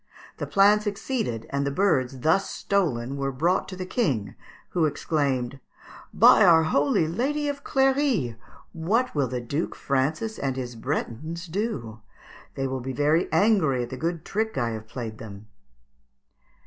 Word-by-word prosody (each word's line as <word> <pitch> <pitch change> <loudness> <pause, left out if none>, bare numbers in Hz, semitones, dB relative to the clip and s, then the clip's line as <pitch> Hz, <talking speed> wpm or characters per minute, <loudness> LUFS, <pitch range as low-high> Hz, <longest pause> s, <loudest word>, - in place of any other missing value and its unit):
The - - -4
plan 205 +2 +5
succeeded, 205 - -3
and 140 0 0
the 140 - 0
birds 135 -6 +1
thus 160 +7 +2
stolen 140 -10 -1
were 135 0 -1
brought 170 +8 +1
to 185 - -6
the 185 0 -5
King, 135 - -1 0.4
who 170 -3 +1
exclaimed, 140 -4 -1 0.5
"By - - +7
our 165 -2 +6
holy 145 0 +2
Lady 280 - -1
of 285 -1 -4
Cléry! 265 - +1 0.4
what 215 +10 0
will 140 -3 +1
the 125 0 -3
Duke 140 +7 -3
Francis 155 +11 -1
and 135 -2 -1
his 125 -2 -5
Bretons 150 +6 -4
do? 160 - -4 0.5
They 135 - -2
will 130 -1 -3
be 130 +2 -4
very 150 +5 +1
angry 165 - +3
at 120 - -8
the - - -4
good 165 +3 -3
trick 220 -2 -2
I 120 -3 0
have 110 -1 -7
played 110 -2 -6
them." 100 -1 -10
150 Hz, 155 wpm, -25 LUFS, 130-195 Hz, 0.5 s, By